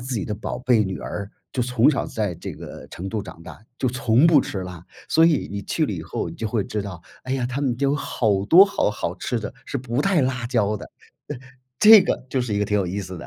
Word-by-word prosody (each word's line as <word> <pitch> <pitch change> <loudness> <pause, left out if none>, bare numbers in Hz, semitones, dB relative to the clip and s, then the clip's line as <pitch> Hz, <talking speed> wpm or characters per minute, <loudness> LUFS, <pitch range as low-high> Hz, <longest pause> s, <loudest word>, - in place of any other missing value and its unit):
自 125 +1 -4
己 100 - -2
的 105 - -3
宝 115 +3 -5
贝 125 -4 +3
女 95 0 -4
儿 100 -1 -5 0.2
就 130 - -2
从 125 +2 +3
小 140 - -2
在 105 -5 -2
这 - - -7
个 - - -10
成 95 +3 -7
都 110 -2 -2
长 85 - -11
大 90 - -11 0.2
就 130 - 0
从 125 +2 +2
不 155 -5 +6
吃 100 - -5
辣。 90 -2 -9 0.2
所 165 +1 +5
以 160 -3 +1
你 100 0 -4
去 - - -1
了 - - -3
以 - - -4
后 - - -4
你 - - -8
就 110 - -3
会 110 -2 0
知 105 - -3
道， 90 -5 -8 0.2
哎 130 - -3
呀， 130 -2 -1
他 130 +3 -4
们 125 -4 0
就 140 +1 +1
有 - - +1
好 105 -8 0
多 180 - +8
好 195 - 0
好 90 -4 -3
吃 120 +4 -2
的 105 - -6
是 - - -3
不 120 +1 -2
带 195 -5 +2
辣 130 -2 -1
椒 110 -4 +1
的， - - -10 0.4
呃， - - -4 0.4
这 215 -2 +10
个 - - -2
就 130 - 0
是 115 -4 -2
一 - - 0
个 - - +2
挺 105 +1 0
有 95 - 0
意 95 +3 -3
思 95 -3 -7
的。 - - -9
115 Hz, 290 characters per minute, -23 LUFS, 100-130 Hz, 0.4 s, 这